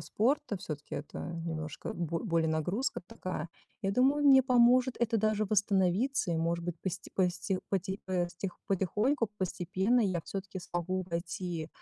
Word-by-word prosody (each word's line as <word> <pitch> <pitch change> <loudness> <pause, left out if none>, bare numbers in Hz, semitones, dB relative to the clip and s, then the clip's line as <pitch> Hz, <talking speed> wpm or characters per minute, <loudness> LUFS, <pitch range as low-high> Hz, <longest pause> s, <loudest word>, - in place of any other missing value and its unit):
спорта, 215 - 0
всё-таки 155 -6 -6
это 145 - -6 0.3
немножко 155 -3 -4
бо 170 -1 -2
более 165 -4 +2
нагрузка 180 - -1
такая. 185 -7 -5 0.3
Я 195 - +1
думаю, 275 +5 +3
мне 265 -1 +8
поможет 250 0 +5
это 230 -1 +2
даже 215 0 +2
восстановиться 200 +3 +2
и, 165 - 0
может 170 +1 0
быть, 175 -1 -3
посте 185 -1 -4
посте 185 +1 0
поти 190 +1 -2
постих 180 0 -2
потихоньку, 210 - +1
постепенно 190 +5 +1
я 185 -6 +1
всё-таки 195 -1 -5
смогу 180 +2 -2
войти 170 -1 -3
190 Hz, 140 wpm, -31 LUFS, 170-220 Hz, 0.3 s, мне